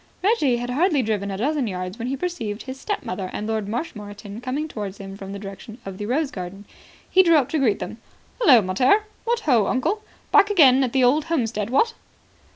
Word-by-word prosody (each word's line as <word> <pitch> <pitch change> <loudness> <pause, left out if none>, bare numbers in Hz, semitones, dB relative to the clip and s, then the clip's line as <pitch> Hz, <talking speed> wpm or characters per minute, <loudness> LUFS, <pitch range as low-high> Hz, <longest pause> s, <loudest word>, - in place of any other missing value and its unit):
Reggie 370 - +3
had 245 +1 -4
hardly 300 0 +2
driven 210 -2 -1
a 195 - -4
dozen 275 +3 0
yards 185 +2 -5
when 235 - -3
he 270 +1 -2
perceived 250 -11 -4
his 265 0 -7
stepmother 190 - -4
and 210 - -4
Lord 220 -2 -2
Marshmoreton 210 -3 -6
coming 265 +5 -2
towards 205 -8 -6
him 195 0 -8
from 195 -1 -8
the 200 - -5
direction 200 +3 -9
of 195 0 -7
the 205 - -4
rose 280 +4 0
garden. 190 +2 -7 0.4
He 375 - +5
drew 335 -3 +5
up 280 -5 +3
to 315 - 0
greet 230 -7 +2
them. - - -7 0.4
"Hullo, 255 - +6
mater. 250 - +3 0.2
What 470 0 0
ho, 240 - +3
uncle! 330 - 0 0.3
Back 405 - +6
again 275 -9 +6
at 250 - -2
the 265 -1 +3
old 285 +5 +3
homestead, 230 -10 -1
what?" 450 - +2
245 Hz, 205 wpm, -23 LUFS, 205-300 Hz, 0.4 s, Hullo